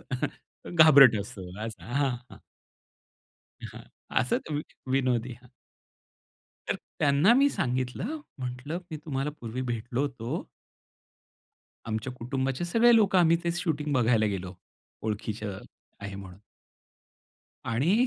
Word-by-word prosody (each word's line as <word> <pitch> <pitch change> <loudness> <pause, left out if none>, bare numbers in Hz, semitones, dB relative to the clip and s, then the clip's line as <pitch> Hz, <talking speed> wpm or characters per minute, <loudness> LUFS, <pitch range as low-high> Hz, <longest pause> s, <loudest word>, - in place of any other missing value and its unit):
असं, - - -17 0.7
घाबरट 145 -7 +9
असतो 95 -2 -8 0.2
असा. 110 -3 -7
हां, 135 +3 +1 0.2
हां. - - -12 1.3
हं, - - -9 0.4
असचं 135 +5 -1
वी 145 - -1 0.3
विनोदी. 125 -2 +1
हां. 125 - -18 1.2
तर - - +1 0.2
त्यांना 145 +9 +5
मी 280 +2 +5
सांगितलं. 130 - -2 0.2
म्हटलं 125 +6 -4
"मी 155 - -4
तुम्हाला 140 0 -1
पूर्वी 120 +2 -5
भेटलो 120 +2 -3
होतो." 125 -5 -4 1.4
आमच्या 110 +3 -3
कुटुंबाचे 130 +4 -2
सगळे 230 +7 +5
लोकं 200 -4 +4
आम्ही 170 -1 +5
तेच 170 0 0
शूटिंग 150 -4 -1
बघायला 115 -4 +3
गेलो. 95 -2 -3 0.5
ओळखीचं 105 -2 -3 0.4
आहे 100 -1 -6
म्हणून. 95 -2 -9 1.3
आणि 175 - +2
130 Hz, 115 wpm, -28 LUFS, 115-155 Hz, 1.4 s, घाबरट